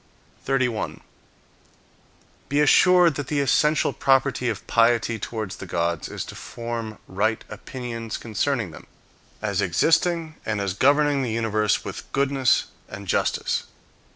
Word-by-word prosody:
31. 130 Hz, -4 st, -1 dB, 1.5 s
Be 145 Hz, +2 st, +1 dB
assured 175 Hz, +3 st, +6 dB
that 140 Hz, -1 st, -5 dB
the 150 Hz, -, 0 dB
essential 150 Hz, +2 st, +2 dB
property 135 Hz, -2 st, +2 dB
of 110 Hz, -4 st, -4 dB
piety 115 Hz, -1 st, +2 dB
towards 110 Hz, -2 st, -5 dB
the 95 Hz, -, -8 dB
gods 85 Hz, -1 st, -1 dB
is -, -, -5 dB
to -, -, -9 dB
form 115 Hz, -2 st, -6 dB
right 110 Hz, +4 st, 0 dB
opinions 115 Hz, +1 st, -6 dB
concerning 115 Hz, -, -1 dB
them, -, -, -13 dB, 0.6 s
as -, -, 0 dB
existing 160 Hz, -, +2 dB
"I -, -, -7 dB
and 105 Hz, -, -2 dB
as 100 Hz, -2 st, -1 dB
governing 145 Hz, +5 st, +3 dB
the 125 Hz, -, -1 dB
universe 110 Hz, -2 st, 0 dB
with -, -, -7 dB
goodness 135 Hz, -2 st, +2 dB, 0.2 s
and 95 Hz, 0 st, -8 dB
justice. -, -, 0 dB
120 Hz, 130 wpm, -24 LUFS, 110-140 Hz, 1.5 s, assured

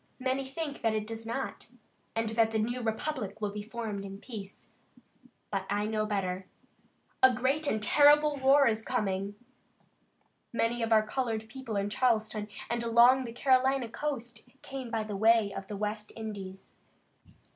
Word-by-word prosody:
Many 260 Hz, +1 st, -1 dB
think 295 Hz, 0 st, -5 dB
that 225 Hz, -2 st, +1 dB
it 215 Hz, -1 st, -1 dB
does 225 Hz, +1 st, -7 dB
not; 265 Hz, +4 st, -4 dB, 0.5 s
that 225 Hz, 0 st, +2 dB
the 225 Hz, -, -1 dB
new 240 Hz, +3 st, -1 dB
republic 220 Hz, -2 st, -3 dB
will 210 Hz, -1 st, -2 dB
be 210 Hz, 0 st, -5 dB
formed 215 Hz, -2 st, -5 dB
in 195 Hz, 0 st, -7 dB
peace, 200 Hz, -3 st, -9 dB, 0.9 s
but 195 Hz, -2 st, -2 dB
I 205 Hz, +1 st, 0 dB
know 215 Hz, 0 st, -1 dB
better. 190 Hz, -2 st, -2 dB, 0.7 s
A 260 Hz, -, +8 dB
great 270 Hz, +6 st, 0 dB
and 215 Hz, -5 st, 0 dB
terrible 295 Hz, +4 st, +6 dB
war 275 Hz, +1 st, +5 dB
is 225 Hz, -3 st, +2 dB
coming. 200 Hz, -4 st, -1 dB, 1.2 s
Many 235 Hz, +1 st, 0 dB
of 230 Hz, 0 st, -1 dB
our 215 Hz, -1 st, +5 dB
colored 225 Hz, -2 st, -2 dB
people 235 Hz, -1 st, -6 dB
in 200 Hz, 0 st, -1 dB
Charleston 215 Hz, -2 st, +1 dB, 0.2 s
and 235 Hz, 0 st, -1 dB
along 240 Hz, +3 st, +5 dB
the 230 Hz, -, -6 dB
Carolina 260 Hz, +1 st, +2 dB
coast 245 Hz, -3 st, -5 dB
came 265 Hz, -3 st, -6 dB
by 225 Hz, -2 st, -1 dB
the 210 Hz, -1 st, -5 dB
way 220 Hz, 0 st, +4 dB
of 195 Hz, -, -6 dB
the 205 Hz, -, -5 dB
West 210 Hz, +1 st, -3 dB
Indies. 200 Hz, -4 st, -7 dB
225 Hz, 155 wpm, -30 LUFS, 210-255 Hz, 1.2 s, A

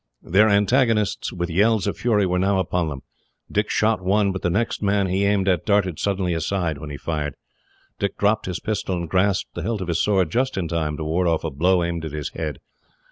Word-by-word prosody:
Their 105 Hz, +5 st, +4 dB
antagonists, 105 Hz, +1 st, +2 dB
with 85 Hz, -1 st, -3 dB
yells 105 Hz, +3 st, +3 dB
of -, -, -1 dB
fury, 105 Hz, -4 st, +2 dB
were 90 Hz, 0 st, 0 dB
now 95 Hz, +1 st, +2 dB
upon 90 Hz, -2 st, 0 dB
them. 70 Hz, -3 st, -7 dB, 0.5 s
Dick 105 Hz, +1 st, 0 dB
shot 110 Hz, -2 st, +1 dB
one, 100 Hz, +2 st, +2 dB
but 95 Hz, -, -5 dB
the 90 Hz, -, 0 dB
next 110 Hz, +7 st, -1 dB
man 100 Hz, -1 st, +2 dB
he 95 Hz, +2 st, 0 dB
aimed 100 Hz, -1 st, +1 dB
at 90 Hz, -4 st, +2 dB
darted 100 Hz, -6 st, +1 dB
suddenly 95 Hz, -3 st, 0 dB
aside 80 Hz, -2 st, -1 dB
when 75 Hz, 0 st, -7 dB
he 70 Hz, -, -6 dB
fired. 75 Hz, -3 st, -3 dB, 0.6 s
Dick 100 Hz, -, -2 dB
dropped 105 Hz, 0 st, +1 dB
his 90 Hz, -2 st, -3 dB
pistol, 100 Hz, -3 st, -2 dB
and 85 Hz, -1 st, -4 dB
grasped 95 Hz, +2 st, +1 dB
the -, -, -5 dB
hilt 115 Hz, -2 st, -2 dB
of 95 Hz, -2 st, -5 dB
his 85 Hz, -, +1 dB
sword 95 Hz, -6 st, +2 dB
just 130 Hz, +1 st, 0 dB
in 90 Hz, -3 st, -1 dB
time 80 Hz, -2 st, -2 dB
to 80 Hz, -, -4 dB
ward 85 Hz, +4 st, 0 dB
off 80 Hz, -2 st, +1 dB
a 80 Hz, -, -2 dB
blow 90 Hz, +5 st, +2 dB
aimed 85 Hz, -1 st, -3 dB
at 80 Hz, -2 st, -5 dB
his 75 Hz, -2 st, -4 dB
head. 80 Hz, -3 st, -4 dB
95 Hz, 225 wpm, -23 LUFS, 85-100 Hz, 0.6 s, Their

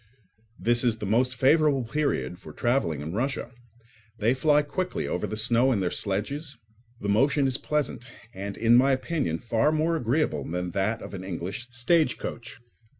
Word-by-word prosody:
This 120 Hz, +1 st, +2 dB
is 120 Hz, -3 st, +2 dB
the 105 Hz, -, -5 dB
most 125 Hz, +5 st, +1 dB
favourable 140 Hz, 0 st, +3 dB
period 135 Hz, -8 st, -2 dB
for -, -, -11 dB
travelling 120 Hz, -, 0 dB
in 80 Hz, +3 st, -5 dB
Russia. 130 Hz, +4 st, -2 dB, 0.7 s
They 110 Hz, +3 st, +2 dB
fly 150 Hz, +2 st, +3 dB
quickly 185 Hz, +5 st, -3 dB
over -, -, -2 dB
the 110 Hz, -, -4 dB
snow 120 Hz, +4 st, +3 dB
in 110 Hz, -, +1 dB
their 90 Hz, -2 st, -1 dB
sledges; 135 Hz, +9 st, -3 dB, 0.4 s
the 105 Hz, -, -4 dB
motion 135 Hz, +7 st, +3 dB
is 130 Hz, 0 st, 0 dB
pleasant, 150 Hz, -5 st, -2 dB, 0.3 s
and, 100 Hz, +1 st, -6 dB
in 115 Hz, +1 st, +4 dB
my 135 Hz, +3 st, +5 dB
opinion, 130 Hz, -, -1 dB
far 115 Hz, -, +1 dB
more 160 Hz, +2 st, +1 dB
agreeable 125 Hz, -, 0 dB
than 90 Hz, +4 st, -3 dB
that 100 Hz, +5 st, -1 dB
of -, -, -9 dB
an 95 Hz, -1 st, -6 dB
English 95 Hz, +6 st, -5 dB
stagecoach. 120 Hz, -2 st, 0 dB
120 Hz, 165 wpm, -26 LUFS, 100-140 Hz, 0.7 s, my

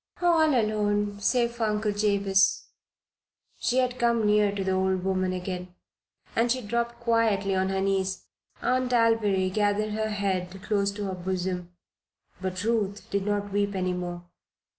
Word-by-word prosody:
"All 320 Hz, -6 st, +4 dB
alone 205 Hz, -1 st, 0 dB
save 235 Hz, +3 st, +2 dB
for 235 Hz, -1 st, -2 dB
Uncle 210 Hz, 0 st, 0 dB
Jabez." 200 Hz, -2 st, +2 dB, 0.9 s
She 250 Hz, -, 0 dB
had 255 Hz, -1 st, +1 dB
come 235 Hz, -2 st, +2 dB
near 210 Hz, -1 st, +4 dB
to 200 Hz, -1 st, -3 dB
the 190 Hz, -, 0 dB
old 190 Hz, -1 st, +1 dB
woman 185 Hz, -1 st, 0 dB
again. 180 Hz, 0 st, -5 dB, 0.6 s
As 235 Hz, +1 st, +3 dB
she 255 Hz, -1 st, -5 dB
dropped 235 Hz, +2 st, -2 dB
quietly 225 Hz, -4 st, +1 dB
on 190 Hz, 0 st, +1 dB
her 190 Hz, 0 st, -1 dB
knees 190 Hz, -1 st, -1 dB, 0.4 s
Aunt 255 Hz, 0 st, +1 dB
Alviry 215 Hz, -5 st, +2 dB
gathered 210 Hz, +1 st, +1 dB
her 220 Hz, +1 st, -1 dB
head 195 Hz, -3 st, -2 dB
close 200 Hz, -2 st, +1 dB
to 205 Hz, 0 st, -5 dB
her 195 Hz, -1 st, -3 dB
bosom; 180 Hz, -1 st, -3 dB, 0.7 s
but 185 Hz, 0 st, -3 dB
Ruth 210 Hz, -3 st, -1 dB
did 200 Hz, 0 st, -1 dB
not 205 Hz, -1 st, -1 dB
weep 200 Hz, 0 st, 0 dB
any 185 Hz, -1 st, 0 dB
more. 175 Hz, -1 st, -5 dB
205 Hz, 155 wpm, -27 LUFS, 190-225 Hz, 0.9 s, All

